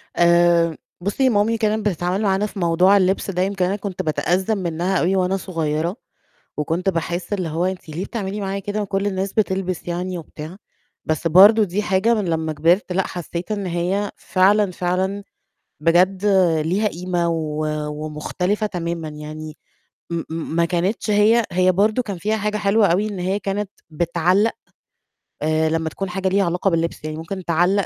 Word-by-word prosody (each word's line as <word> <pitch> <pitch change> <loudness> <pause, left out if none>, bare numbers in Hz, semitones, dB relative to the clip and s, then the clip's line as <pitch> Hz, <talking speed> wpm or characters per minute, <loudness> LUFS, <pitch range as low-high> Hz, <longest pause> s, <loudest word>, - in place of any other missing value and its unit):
آآ، 170 -1 +4 0.3
بُصّي 210 +8 +1
مامي 225 0 +2
كانت 215 -1 0
بتتعامل 180 +2 -1
معانا 195 -1 +1
في 210 - -7
موضوع 180 +3 +4
اللبس 190 +1 +1
ده 180 -1 -1
يمكن 190 -1 0
أنا 190 +2 0
كنت 195 -3 -4
بتأذّم 185 +5 0
منها 175 +1 -1
أوي 185 +3 +1
وأنا 185 0 +1
صغيّرة، 165 -1 -2 0.6
وكنت 165 +6 0
باحسّ 175 +2 -2
اللي 185 -5 -2
هو 165 +3 -1
أنتِ 185 -3 -4
ليه 165 +5 -4
بتعملي 205 -2 -4
معايا 195 0 -2
كده 205 +2 -3
وكل 200 0 -1
الناس 195 0 -2
بتلبس 190 -4 -1
يعني 180 +1 -3
وبتاع! 160 +1 -9 0.5
بس 155 +1 0
برضه 200 +7 +7
دي 200 +1 -1
حاجة 195 +3 +2
من 210 -4 0
لمّا 160 -2 -1
كبرت 170 +6 +2
لأ، 190 +1 0
حسّيت 175 +2 -5
إن 205 -2 -2
هي 180 +4 -1
فعلًا، 200 +1 +2
فعلًا، 185 +3 -1 0.6
بجد 180 +5 +3 0.4
ليها 195 +6 +1
قيمة 175 -2 -2
و 155 -2 -2 0.2
ومختلفة 155 +7 -2
تمامًا 170 -4 -3
يعني 155 +1 -8 0.5
م 170 - -2
م 160 0 -4
ما 170 - +4
كانتش 180 +6 -1
هي 215 +3 +4
هي 185 +1 +3
برضه 210 +6 +2
كان 200 -6 -5
فيها 210 +5 0
حاجة 210 0 -1
حلوة 210 +1 +3
أوي 195 +4 +1
إن 205 -3 -6
هي 185 +3 -1
كانت 200 0 -3 0.2
بتعلّق، 175 +6 +1 0.9
آآ 155 +1 +1
لمّا 160 0 -1
تكون 195 +4 -5
حاجة 190 +1 -2
ليها 195 +1 +2
علاقة 175 +3 +1
باللبس، 165 -2 -1
يعني 155 0 -4
ممكن 180 +3 -6
تعلّق 180 +4 +2
185 Hz, 170 wpm, -21 LUFS, 170-200 Hz, 0.9 s, برضه